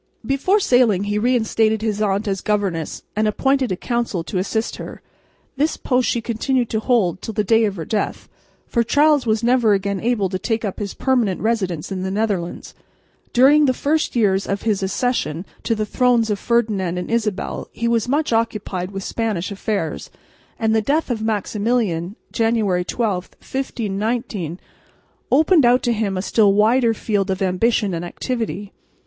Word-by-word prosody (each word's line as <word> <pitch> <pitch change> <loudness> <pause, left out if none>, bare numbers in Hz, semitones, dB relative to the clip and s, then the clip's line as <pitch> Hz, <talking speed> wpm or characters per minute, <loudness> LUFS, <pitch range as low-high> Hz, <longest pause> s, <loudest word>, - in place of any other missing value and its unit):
Before 275 +10 +2
sailing 245 - +3
he 205 +1 -1
reinstated 220 -2 +1
his 215 -2 -1
aunt 205 +1 0
as 195 -1 -1
governess, 195 -7 -2
and 215 +1 +1
appointed 265 +3 +1
a - - +1
council 235 -4 -2
to 185 +2 -3
assist 220 +4 -2
her. - - -8 0.6
This 300 +3 +1
post 250 -1 +1
she 235 - 0
continued 240 +2 -1
to 220 - +1
hold 210 -7 +1
till 220 - -6
the 210 - +1
day 225 +2 +4
of 205 -2 -2
her 165 -4 -5
death, 210 +3 -2 0.4
for 235 - 0
Charles 290 +2 +3
was 220 +1 +1
never 240 -3 +4
again 200 0 -2
able 225 -3 +1
to 185 0 -3
take 225 +1 -1
up 195 - -4
his 205 -2 -4
permanent 240 -8 +1
residence 195 -8 -1
in 190 -1 -3
the 190 - -2
Netherlands. 195 -4 -2 0.6
During 285 +4 +6
the 255 -2 +2
first 305 +2 0
years 200 -4 +2
after 200 +2 -3
his 210 -3 +1
accession 190 -5 -1 0.2
to 230 - 0
the 215 0 -1
thrones 235 -1 +2
of 205 - -1
Ferdinand 210 -7 0
and 180 - -4
Isabel 215 -4 -2
he 235 - -2
was 235 0 +1
much 295 -1 +1
occupied 210 -5 -1
with 195 -1 -6
Spanish 210 -6 -2
affairs; 200 -4 -3 0.5
and 220 -1 +1
the 220 - +3
death 285 +5 0
of 225 -3 -2
Maximilian, 210 -3 -1 0.2
January 220 -6 +1
12, 195 -2 -1
1519, 215 - -3 0.7
opened 310 +3 +5
out 245 +1 +4
to 240 - +2
him 210 -4 -1
a 185 - -2
still 205 -2 +3
wider 225 +3 +3
field 205 -3 -1
of 190 0 -1
ambition 200 +2 +1
and 165 0 -3
activity. 210 +1 -4
220 Hz, 170 wpm, -20 LUFS, 195-240 Hz, 0.7 s, During